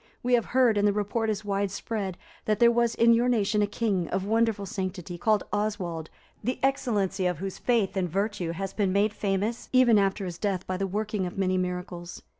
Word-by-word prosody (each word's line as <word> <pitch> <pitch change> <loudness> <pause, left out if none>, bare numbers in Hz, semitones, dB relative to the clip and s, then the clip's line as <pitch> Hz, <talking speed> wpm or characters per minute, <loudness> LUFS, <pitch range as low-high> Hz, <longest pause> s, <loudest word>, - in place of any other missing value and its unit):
We 250 +1 +1
have 235 -2 +4
heard, 245 -5 +3
and 205 - +3
the 205 - +3
report 210 +2 -1
is 210 0 -2
widespread, 200 -1 -2 0.3
that 215 -1 +1
there 235 +2 +6
was 235 -1 +1
in 235 0 +5
your 240 +2 +3
nation 210 -3 +2
a 205 - +2
king, 200 -5 -1
of 190 +1 -2
wonderful 225 -1 +1
sanctity, 185 -3 -4
called 215 +2 +2
Oswald, 190 -7 -2 0.3
the 250 +4 -1
excellency 210 -9 +1
of 180 - -1
whose 195 0 -5
faith 230 -6 +1
and 185 -2 0
virtue 195 -2 -1
has 195 +2 -4
been 200 -3 +1
made 205 +2 +2
famous 205 +3 -2
even 250 -4 +5
after 195 0 0
his 175 -1 -6
death 195 -3 -1
by 185 - -2
the 195 +1 -1
working 210 -1 -2
of 175 - -8
many 185 -1 +1
miracles. 180 -1 -4
205 Hz, 205 wpm, -27 LUFS, 185-220 Hz, 0.3 s, there